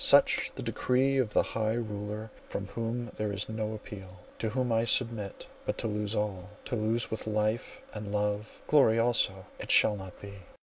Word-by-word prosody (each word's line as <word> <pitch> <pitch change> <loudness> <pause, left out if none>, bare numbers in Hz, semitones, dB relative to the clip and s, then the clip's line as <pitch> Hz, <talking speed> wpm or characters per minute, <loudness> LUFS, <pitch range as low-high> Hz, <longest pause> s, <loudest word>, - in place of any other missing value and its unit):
Such - - +6
the - - -5
decree 135 +2 +2
of 115 -5 0
the - - +5
High 110 0 -1
Ruler 105 -1 -4 0.2
from 100 - -3
whom 115 +3 -3
there 105 -1 -1
is 100 0 -2
no 110 0 -3
appeal: 95 -3 -9 0.2
to 110 - 0
whom 125 +2 0
I 115 0 +3
submit. 115 -4 +1 0.2
But - - -2
to - - -2
lose 105 0 -1
all—to 105 +2 -3
lose 115 +1 0
with 110 0 -4
life 110 - -1
and 105 -1 -5
love, 105 +1 -2
glory 135 -7 +5
also! 115 -5 +2
It - - -7
shall 105 - +6
not 95 -2 -9
be! 100 0 -9
110 Hz, 180 wpm, -30 LUFS, 105-115 Hz, 0.2 s, Such